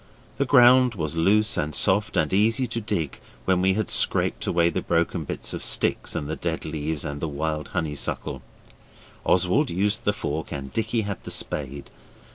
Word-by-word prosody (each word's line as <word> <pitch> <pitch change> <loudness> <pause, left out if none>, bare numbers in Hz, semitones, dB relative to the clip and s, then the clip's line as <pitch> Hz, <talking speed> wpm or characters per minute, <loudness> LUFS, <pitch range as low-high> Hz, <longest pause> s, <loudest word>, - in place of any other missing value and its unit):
The 140 - 0
ground 125 -2 +6
was 80 -3 -3
loose 100 +6 +3
and 75 0 -2
soft 100 +8 +1
and 75 +3 +1
easy 115 +6 +3
to 115 -1 -4
dig 100 -9 -3 0.3
when 95 -1 +2
we 95 0 +3
had 110 0 -2
scraped - - +1
away 85 0 +2
the - - -2
broken 85 -1 0
bits - - -3
of - - -5
sticks - - 0
and 70 - -3
the 80 - -3
dead 85 -2 -3
leaves 75 0 -3
and 70 -1 -5
the 80 - -1
wild 75 +1 -3
honeysuckle; 75 -5 -3 0.8
Oswald 95 - +3
used 100 +4 0
the 105 - +2
fork 80 -6 -4
and 70 -3 -6
Dicky 115 +1 0
had 100 -3 -5
the - - -7
spade. 70 -1 -3
85 Hz, 180 wpm, -25 LUFS, 75-105 Hz, 0.8 s, ground